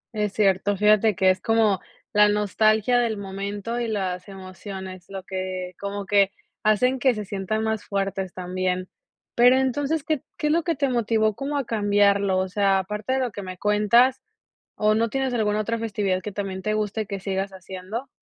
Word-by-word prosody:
Es 210 -1 -1
cierto, 200 -1 +2
fíjate 210 0 +4
que 190 -1 +4
es 185 - -3
como, 220 -4 +2 0.3
la 210 0 +6
nostalgia 215 +3 +2
del 225 -3 0
momento 200 +4 -4
y 235 - -1
las 190 -3 -3
emociones, 190 -1 -9
lo 195 -1 -6
que, 185 -1 -4
como 200 0 -4
que, 200 -1 +3 0.3
hacen 250 +5 +3
que 255 -3 +3
se 210 - -4
sientan 200 +3 -2
más 220 -1 -1
fuertes 195 -2 -2
también. 185 0 -2 0.5
Pero 245 +2 +6
entonces, 275 +3 0
¿qué 305 -3 -1 0.2
qué 300 - -1
es 300 - +3
lo 335 - +3
que 335 0 0
te 280 0 +1
motivó 225 -3 +1
como 285 +4 -3
a 275 - -1
cambiarlo?, 200 -3 +2
o 185 - 0
sea, 195 0 +2
aparte 210 +6 -3
de 265 - +1
lo 245 -3 -1
que 205 - -7
me 185 -1 -7
cuentas, 210 +6 +3 0.6
o 215 0 +3
no 230 +1 +1
tienes 265 -1 -1
alguna 210 -2 +1
otra 230 +2 -1
festividad 200 -4 -1
que 210 - -5
también 190 -1 -4
te 215 - -1
guste 215 0 -1
que 200 -1 -5
sigas 195 0 -2
haciendo. 190 +6 -7
205 Hz, 190 wpm, -24 LUFS, 190-225 Hz, 0.6 s, la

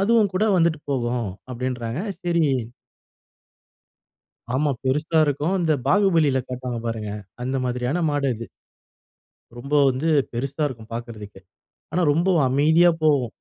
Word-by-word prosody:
அதுவும் 215 0 +3
கூட 185 +3 +1
வந்துட்டு 165 -3 +2
போகும் 120 -4 -1 0.2
அப்டின்றாங்க. 125 +1 -3 0.2
சரி. 170 -2 +1 2.1
ஆமா 145 +2 +1
பெருசா 150 +5 +1
இருக்கும். 145 +6 0
இந்த 160 -3 +2
பாகுபலியில 165 -10 +3
காட்டுவாங்க 125 -2 -4
பாருங்க. 110 -2 -3 0.3
அந்த 130 +1 -1
மாதிரியான 125 +7 -1
மாடு 145 -2 0
அது. 115 +1 -7 1.1
ரொம்ப 140 +4 -8 0.2
வந்து 130 +6 -2 0.2
பெருசா 135 +5 -3
இருக்கும் 115 -3 -11
பார்க்கறதுக்கு. 110 -4 -8 0.5
ஆனா 180 - +1
ரொம்ப 170 +5 +1 0.2
அமைதியா 160 +6 +4
போகும். 145 -5 +3
140 Hz, 115 wpm, -23 LUFS, 120-165 Hz, 2.1 s, அமைதியா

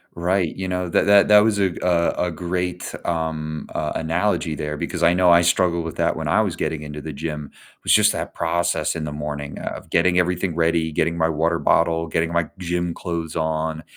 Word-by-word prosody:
Right, 90 0 0
you 95 0 -4
know, 90 -1 -2
that - - +2
that 100 0 +6
that 105 0 +8
was 105 -2 +1
a 95 - +3
g 85 - -8
a 85 -2 +2 0.2
a 90 - -3
great, 90 +1 -3
um, 80 -2 -3
uh, - - -1
analogy 80 0 0
there 75 +1 -4
because 85 - -3
I 85 - +5
know 90 0 +4
I 85 - +7
struggled 85 0 +2
with 80 - -6
that 85 0 +1
when 80 -1 -4
I 85 +8 +3
was 95 -6 -1
getting 80 -2 -3
into 75 0 -7
the 80 - -6
gym. 75 0 -5
It - - -24 0.3
was - - +3
just - - +5
that - - -5
process 85 +1 0
in 80 - -4
the 75 - -4
morning 75 -1 -5
of - - -6
getting 90 +1 +3
everything 90 -1 0
ready, 80 -1 +1
getting 80 +2 0
my 80 0 +2
water 80 +2 0
bottle, 80 +2 +2
getting 80 +1 -1
my 85 -2 0
gym 90 -1 -2
clothes 85 -2 -4
on, 80 0 -2
85 Hz, 220 wpm, -22 LUFS, 80-90 Hz, 0.3 s, that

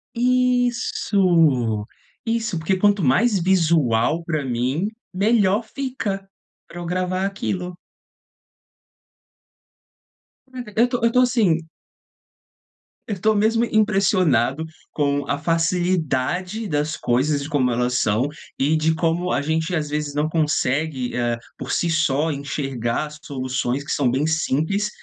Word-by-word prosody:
Isso. 200 - +2 0.4
Isso, 225 -5 -1
porque 190 +4 0
quanto 205 -1 +3
mais 200 - +3
visual 165 -6 +2
pra 155 -3 -2
mim, 130 +9 -1 0.3
melhor 205 +1 +2
fica 220 -7 -4 0.4
pra 175 - -9
eu 175 - -6
gravar 185 +2 -1
aquilo. 185 -2 -3 2.7
Caraca, 245 -5 -8
eu 240 - +6
tô 245 -2 -3
eu 230 - +3
tô 250 - +3
assim 220 -10 +2 1.5
Eu 205 -5 -4
tô 215 +4 +3
mesmo 225 +3 +2
impressionado 185 - +2 0.3
com 145 -1 0
a 140 - 0
facilidade 175 - 0
das 150 -1 -1
coisas 140 +4 0
e - - -4
de 145 - -7
como 135 -6 +1
elas 125 +1 0
são, 110 +6 +1 0.3
e 145 +4 +2
de 160 +1 +2
como 170 +2 0
a 140 - +1
gente, 160 +4 -1
às 150 -2 -2
vezes, 150 -1 -3
não 150 +2 0
consegue, 150 -4 0
eh, 120 -1 0 0.2
por - - -6
si 170 - +1
só 155 -1 +1
enxergar 135 -3 -2
as 150 0 -11
soluções 130 -1 -2
que 140 - -6
são 135 -4 +2
bem 135 +5 0
simples 160 +6 0
165 Hz, 130 wpm, -22 LUFS, 140-195 Hz, 2.7 s, eu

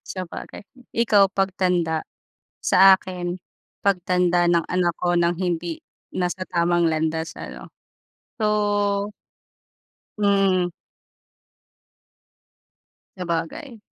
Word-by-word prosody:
Sabagay, 185 +2 -7 0.2
ikaw 205 -4 +3
pagtanda, 180 -4 0 0.6
sa 190 +1 +7
akin 180 -1 -3 0.4
pagtanda 180 -2 +2
ng 170 -1 +3
anak 180 -2 +1
ko 175 -1 +2
ng 170 0 +2
hindi 170 -2 -2 0.3
nasa 180 +1 -2
tamang 175 0 +1
landas 160 +1 -1
ano - - -9 0.7
so, 205 -1 +1 1.1
Mm. 195 -3 +2 2.5
Sabagay. 180 - -4
180 Hz, 75 wpm, -23 LUFS, 175-195 Hz, 2.5 s, sa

